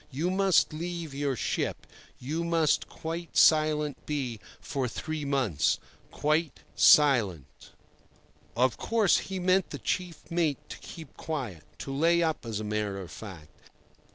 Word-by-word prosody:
You 155 +6 -1
must 190 -4 +3
leave 170 -1 -5
your 140 -1 -1
ship; - - -2 0.3
you 155 +6 -3
must 165 -3 +1
quite 165 +1 -6
silent 155 -2 +4
be 130 -7 -2 0.2
for 135 -3 -2
three 155 +5 -4
months—quite 140 - -1
silent." 100 - +4 0.9
Of 125 +1 +2
course, 220 -5 +3
he 195 - -5
meant 185 +1 +2
the - - -5
chief 180 -1 -4
mate 165 -5 +1
to - - -8
keep 160 -5 -11
quiet—to 130 - -6
lay 170 +3 +3
up, 160 -7 -2
as 110 -2 -3
a - - -4
matter 105 -2 -2
of 90 -3 -8
fact. 85 -8 -10
150 Hz, 130 wpm, -28 LUFS, 120-170 Hz, 0.9 s, silent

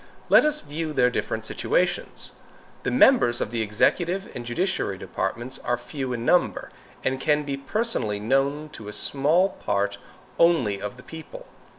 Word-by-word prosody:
Let - - +7
us 300 0 +1
view 155 +2 -4
their 125 -3 +3
different 110 -2 -2
situations. 175 +9 -1 0.5
The - - -1
members 255 - +5
of 105 - -2
the 115 -1 -1
executive 175 - +1
and 125 - -5
judiciary 120 - -1
departments 120 +8 -4
are 120 - -1
few 130 +2 -5
in 120 -1 -3
number, 180 - +2 0.3
and 130 0 -1
can 150 0 +2
be 140 -1 -3
personally 135 - -1
known 135 +7 0
to 110 -7 -9
a 105 - -5
small 155 - +2
part 100 - -2 0.4
only 125 - +3
of 105 +4 -5
the 125 - -13
people. 160 - -10
135 Hz, 160 wpm, -25 LUFS, 115-170 Hz, 0.5 s, Let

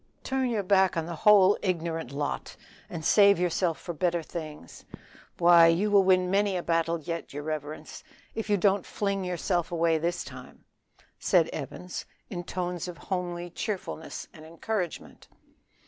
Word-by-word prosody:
"Turn 265 -1 0
your 220 -4 -1
back 190 -2 +3
on 165 - -1
the 170 - -5
whole 200 +3 +5
ignorant 165 -7 -2
lot, 145 +1 -4 0.3
and 160 -2 -6
save 200 -2 +6
yourself 175 -1 0
for 175 - -6
better 170 +1 0
things. 155 - -8 0.5
Why, 170 -1 +7
you 180 +6 +2
will 200 -1 +7
win 185 -1 +3
many 200 -1 +2
a 175 - -3
battle 165 0 +1
yet, 165 0 -5
your 145 +1 -5
reverence, 155 0 -6 0.3
if 225 -1 -4
you 205 - +3
don't 195 0 +2
fling 200 -2 -2
yourself 175 -1 -1
away 165 -1 +2
this 175 +2 -1
time," 125 -1 -12 0.5
said - - +3
Evans 180 0 -6 0.3
in 175 -3 -4
tones 180 -1 -3
of 175 -2 -7
homely 175 +1 -4
cheerfulness 190 -5 -5
and 155 - -13
encouragement. 175 +3 -5
175 Hz, 155 wpm, -28 LUFS, 165-190 Hz, 0.5 s, Why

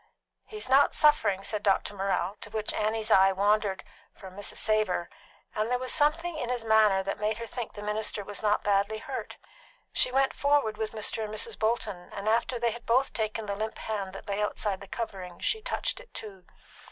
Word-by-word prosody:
"He's 425 0 -4
not 270 +2 +5
suffering," 200 -10 +4
said 210 0 -2
Dr. 200 0 +2
Morrell, 195 -1 -1
to - - -4
whom 215 0 -2
Annie's 220 +1 0
eye 195 -1 +7
wandered 200 0 +1 0.3
from 190 -2 -11
Mrs. 205 - -5
Savor, 215 -5 +1 0.4
and 215 +1 -1
there 250 - +2
was 255 0 -1
something 315 +3 +2
in 245 -5 -3
his 245 -2 -2
manner 215 -3 +5
that 195 - -3
made 215 +1 0
her 230 - -5
think 235 0 -6
the 205 - -8
minister 210 0 -2
was 205 -1 -5
not 210 -1 +2
badly 205 +1 +2
hurt. 215 - -6 0.6
She - - +3
went 270 +1 +2
forward 285 -7 +2
with 220 0 -3
Mr. 220 +1 -2
and 210 - -5
Mrs. 215 +1 -2
Bolton, 215 -5 -1
and 200 +1 -5
after 235 +3 +2
they 235 0 +1
had 235 +1 -9
both 255 +4 +3
taken 220 0 -2
the 200 - -2
limp 220 +2 -3
hand 200 -4 -4
that 195 - -9
lay 200 +1 -1
outside 205 -2 -1
the 195 - -9
covering, 190 -7 -5
she 440 - -1
touched - - -2
it - - -15
too. 195 -4 -8
215 Hz, 200 wpm, -29 LUFS, 200-235 Hz, 0.6 s, eye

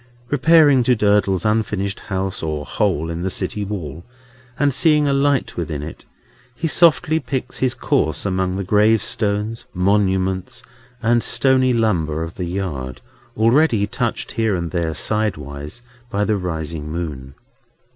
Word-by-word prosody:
Repairing 145 -2 +5
to 125 +1 +3
Durdles's 100 -3 +2
unfinished 105 -2 0
house, 95 -1 -3
or 75 -2 -3
hole 85 -6 -1
in 85 +1 -4
the 95 - -1
city 95 +2 -3
wall, 85 -6 -6 0.5
and 145 -2 +2
seeing 150 +1 +4
a 140 - +2
light 140 0 +1
within 75 -4 -4
it, 80 - -9 0.5
he 165 - -2
softly 160 0 +3
picks 130 -4 -4
his 130 -1 +1
course 120 - 0
among 95 -1 0
the 100 - -2
gravestones, 105 +1 +1
monuments, 95 +4 0 0.4
and 120 +1 +3
stony 130 0 +2
lumber 85 -10 0
of 80 +1 -6
the 90 - -4
yard, 75 -9 -4 0.4
already 115 -1 +3
touched 120 +2 -3
here 110 -3 0
and 85 -2 -3
there, 85 -3 -1
sidewise, 75 - -3 0.3
by 105 -3 0
the 110 - +1
rising 80 -4 -4
moon. 70 -6 -5
100 Hz, 140 wpm, -20 LUFS, 85-120 Hz, 0.5 s, Repairing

